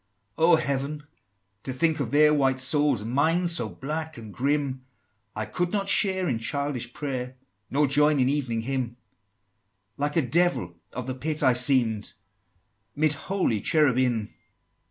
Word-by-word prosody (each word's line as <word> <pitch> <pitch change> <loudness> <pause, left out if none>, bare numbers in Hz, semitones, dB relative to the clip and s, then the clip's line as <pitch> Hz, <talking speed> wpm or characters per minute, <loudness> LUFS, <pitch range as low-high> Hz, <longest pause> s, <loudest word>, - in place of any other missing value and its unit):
XXIII. - - -17
"Oh, 175 - +7
Heaven! 140 0 -2 0.6
to 130 - -5
think 155 +4 +1
of 135 -6 -2
their 150 +3 +5
white 135 -3 +2
souls, 140 -3 +2
And 115 - -5
mine 165 +7 +2
so 165 -10 0
black 155 - -5
and 110 -3 -10
grim! 140 -1 -1 0.5
I 110 0 -2
could 175 - -2
not 200 -1 -1
share 190 -3 +2
in 120 -6 -1
childish 130 0 -3
prayer, 130 -2 -5 0.3
Nor 145 +2 +2
join 150 +1 +3
in 130 - +3
Evening 130 -5 -1
Hymn: 125 -1 -3 1.0
Like 145 +1 -2
a 165 - +3
Devil 130 - +1 0.2
of 125 0 -4
the 130 - -3
Pit 150 +4 -2
I 130 -2 +5
seem'd, 120 -4 +2 0.8
'Mid 155 0 +2
holy 155 - -1
Cherubim!" 130 -8 +2
140 Hz, 155 wpm, -26 LUFS, 125-155 Hz, 1.0 s, Oh